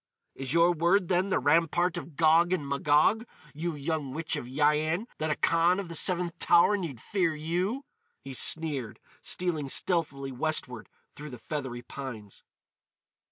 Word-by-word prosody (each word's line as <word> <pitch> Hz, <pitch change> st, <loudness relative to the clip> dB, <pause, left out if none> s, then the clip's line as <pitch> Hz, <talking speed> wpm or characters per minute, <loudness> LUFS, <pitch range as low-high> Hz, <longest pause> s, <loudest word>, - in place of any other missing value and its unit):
"Is 135 Hz, -1 st, -6 dB
your 170 Hz, +2 st, +4 dB
word 175 Hz, +3 st, +2 dB
then 185 Hz, +1 st, +1 dB
the -, -, +2 dB
Rampart 170 Hz, +3 st, +2 dB
of 160 Hz, -2 st, -7 dB
Gog 165 Hz, +3 st, +4 dB
and 150 Hz, -6 st, -2 dB
Magog, 150 Hz, +10 st, +2 dB, 0.3 s
you 160 Hz, +2 st, -3 dB
young 145 Hz, -2 st, -3 dB
witch 160 Hz, 0 st, -2 dB
of 120 Hz, -, -5 dB
Yian, 150 Hz, -, +1 dB
that 155 Hz, -, -1 dB
a 150 Hz, -, +1 dB
Khan 170 Hz, +3 st, +2 dB
of 190 Hz, -4 st, -6 dB
the -, -, -6 dB
Seventh 175 Hz, 0 st, +1 dB
Tower 175 Hz, +4 st, +5 dB
need 165 Hz, -, -5 dB
fear 175 Hz, -, -1 dB
you!" 180 Hz, -, -2 dB, 0.3 s
he 135 Hz, -1 st, -9 dB
sneered, 140 Hz, -4 st, 0 dB, 0.2 s
stealing 160 Hz, -6 st, -2 dB
stealthily 140 Hz, -5 st, -1 dB
westward 125 Hz, -3 st, -2 dB, 0.2 s
through 150 Hz, +1 st, -9 dB
the 125 Hz, -, -9 dB
feathery 125 Hz, 0 st, -5 dB
pines. 115 Hz, -7 st, -9 dB
160 Hz, 155 wpm, -28 LUFS, 140-175 Hz, 0.3 s, Tower